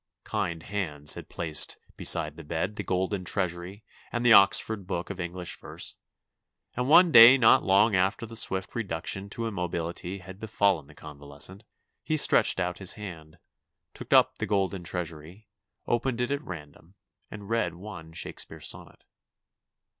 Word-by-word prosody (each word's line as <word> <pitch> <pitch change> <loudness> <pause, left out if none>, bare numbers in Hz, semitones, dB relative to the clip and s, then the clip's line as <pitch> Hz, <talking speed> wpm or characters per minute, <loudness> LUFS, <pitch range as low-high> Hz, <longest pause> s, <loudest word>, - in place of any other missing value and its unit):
Kind 80 -2 -3
hands 75 -7 -1
had - - -10
placed 80 -3 -1 0.2
beside - - +1
the 80 - -10
bed 85 +7 -3
the 105 - -4
Golden 95 0 -2
Treasury 90 +2 -3 0.3
and 120 0 -2
the 120 - +7
Oxford 100 0 +4
Book 90 +2 -4
of 95 - -8
English 90 0 -5
Verse, - - -6 0.8
and 125 +2 -2
one 170 +2 +7
day 120 0 +10
not 115 -4 +5
long 100 +3 +3
after 95 +5 0
the 115 0 -10
swift 95 -3 -1
reduction 95 -2 -3
to 115 +3 -4
immobility 90 -2 -4
had 95 0 -12
befallen 100 -8 0
the 75 - -17
convalescent 75 +8 -6 0.4
he 155 - -1
stretched 115 -8 +4
out 90 -1 -2
his 95 -2 +1
hand, 85 -7 -10 0.6
took - - -11
up - - +4
the - - -2
Golden 95 -2 -1
Treasury, 85 +3 -6 0.4
opened 120 +1 -1
it 125 +2 -1
at 140 0 -1
random, 80 +2 -11 0.3
and 105 -2 -10
read 110 -7 -1
one 85 -4 -10
Shakespeare 80 - -4
sonnet. - - -8
95 Hz, 155 wpm, -27 LUFS, 85-110 Hz, 0.8 s, day